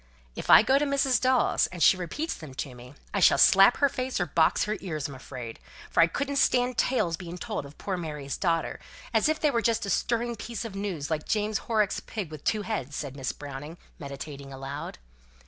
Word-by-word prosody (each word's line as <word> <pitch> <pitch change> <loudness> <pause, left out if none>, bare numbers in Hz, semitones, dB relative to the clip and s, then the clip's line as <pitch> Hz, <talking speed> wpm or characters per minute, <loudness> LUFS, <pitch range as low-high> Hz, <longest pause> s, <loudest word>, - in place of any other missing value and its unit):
"If - - -6
I - - +9
go 265 +5 +4
to 295 - +1
Mrs. 275 -4 +2
Dawes, 255 -1 +3
and 175 -3 -3
she - - +7
repeats 185 - -3
them 150 -5 -10
to 135 -1 -5
me, 125 +3 -13 0.2
I 200 - +1
shall - - +6
slap 195 +4 +7
her 285 - +4
face 255 -3 -3
or 175 - +1
box 160 0 +2
her 210 +1 -1
ears 155 -7 -4
I'm 140 - -9
afraid, 125 -3 -8 0.3
for - - +4
I 165 - +6
couldn't 280 +10 -2
stand 250 -2 +3
tales 210 -10 +1
being 175 -1 -8
told 140 - -4
of 140 - -16
poor 190 -2 -3
Mary's 150 -5 -5
daughter, 165 -3 -1 0.3
as 220 +6 +3
if 310 - 0
they 300 - +2
were 235 -3 +1
just 230 -2 +1
a 200 - -2
stirring 235 +4 0
piece 230 +2 -5
of 225 - -6
news 190 -7 -4
like 155 -1 -2
James 215 0 0
Horrocks' 215 -3 0
pig 200 -8 -6
with 155 -2 -9
two 215 -1 0
heads," 145 - -4
said 140 -3 -5
Miss 135 -2 -3
Browning, 145 +3 -8 0.2
meditating 140 -1 -8
aloud. 135 - -6
180 Hz, 215 wpm, -27 LUFS, 145-230 Hz, 0.3 s, I